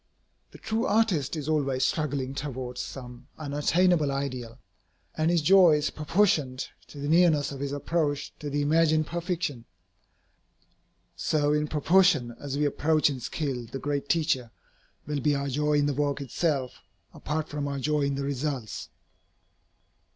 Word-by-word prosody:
The -, -, -13 dB
true 225 Hz, +4 st, -1 dB
artist 200 Hz, -, +1 dB
is 150 Hz, -2 st, -5 dB
always 135 Hz, -4 st, +1 dB
struggling 140 Hz, -4 st, -1 dB
towards 130 Hz, -3 st, -5 dB
some 125 Hz, -1 st, -9 dB
unattainable 155 Hz, +2 st, +2 dB
ideal, 130 Hz, -4 st, -4 dB, 0.6 s
and 155 Hz, +1 st, +1 dB
his 170 Hz, -3 st, +2 dB
joy 185 Hz, 0 st, +7 dB
is 150 Hz, 0 st, 0 dB
proportioned 150 Hz, -5 st, +1 dB, 0.2 s
to -, -, -13 dB
the 140 Hz, 0 st, -4 dB
nearness 155 Hz, -3 st, +4 dB
of 140 Hz, -, -7 dB
his 140 Hz, 0 st, -3 dB
approach 145 Hz, 0 st, -1 dB
to 150 Hz, -, -5 dB
the 145 Hz, +1 st, 0 dB
imagined 155 Hz, +1 st, +3 dB
perfection. 170 Hz, -7 st, -3 dB, 1.5 s
So 145 Hz, -1 st, +1 dB
in 150 Hz, 0 st, +1 dB
proportion 155 Hz, -5 st, +3 dB
as 140 Hz, -1 st, -4 dB
we 150 Hz, -, +2 dB
approach 150 Hz, +1 st, +2 dB
in 135 Hz, -, -5 dB
skill 125 Hz, -2 st, -3 dB
the 135 Hz, -, -6 dB
great 140 Hz, 0 st, -3 dB
Teacher, 155 Hz, -7 st, +1 dB, 0.6 s
will 150 Hz, -1 st, -2 dB
be 145 Hz, +2 st, +2 dB
our 140 Hz, 0 st, -2 dB
joy 150 Hz, +3 st, 0 dB
in 145 Hz, -1 st, +3 dB
the 145 Hz, -, +1 dB
work 145 Hz, 0 st, 0 dB
itself, 140 Hz, -1 st, -2 dB, 0.3 s
apart 155 Hz, 0 st, -3 dB
from 145 Hz, -1 st, -3 dB
our 140 Hz, -1 st, -3 dB
joy 150 Hz, +2 st, 0 dB
in 140 Hz, 0 st, 0 dB
the 140 Hz, -, -3 dB
results. 135 Hz, -6 st, -3 dB
145 Hz, 150 wpm, -27 LUFS, 135-155 Hz, 1.5 s, joy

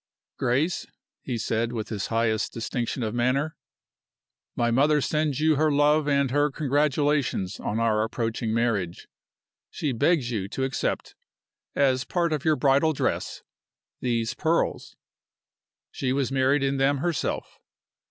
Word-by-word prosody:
"Grace," 145 Hz, +9 st, 0 dB, 0.3 s
he 125 Hz, -3 st, -3 dB
said, 115 Hz, +1 st, -1 dB
with 110 Hz, -3 st, -4 dB
his 105 Hz, -2 st, -3 dB
highest 115 Hz, -1 st, 0 dB
distinction 120 Hz, +2 st, -3 dB
of 110 Hz, -1 st, -2 dB
manner, 130 Hz, +6 st, 0 dB, 1.0 s
"my 120 Hz, 0 st, +1 dB
mother 145 Hz, +5 st, +4 dB
sends 150 Hz, -1 st, 0 dB
you 155 Hz, -1 st, +3 dB
her 155 Hz, +1 st, +3 dB
love 145 Hz, +1 st, +3 dB
and 140 Hz, -2 st, +2 dB
her 145 Hz, +2 st, +2 dB
congratulations 145 Hz, -7 st, 0 dB
on 110 Hz, -, -2 dB
our 110 Hz, -2 st, +2 dB
approaching 115 Hz, 0 st, -2 dB
marriage. 110 Hz, -7 st, -1 dB, 0.6 s
She 145 Hz, -, -2 dB
begs 135 Hz, 0 st, +1 dB
you 100 Hz, -5 st, -2 dB
to 130 Hz, -, -3 dB
accept, 135 Hz, 0 st, -2 dB, 0.6 s
as 130 Hz, -2 st, +2 dB
part 170 Hz, +2 st, 0 dB
of 150 Hz, -2 st, -2 dB
your 155 Hz, -1 st, +3 dB
bridal 140 Hz, +3 st, +3 dB
dress, -, -, -2 dB, 0.6 s
these 115 Hz, -2 st, -1 dB
pearls. 165 Hz, +1 st, -1 dB, 1.0 s
She 130 Hz, -, -2 dB
was 135 Hz, 0 st, 0 dB
married 135 Hz, +1 st, +2 dB
in 135 Hz, 0 st, 0 dB
them 135 Hz, +1 st, +2 dB
herself. 160 Hz, 0 st, -2 dB
135 Hz, 135 wpm, -26 LUFS, 115-150 Hz, 1.0 s, mother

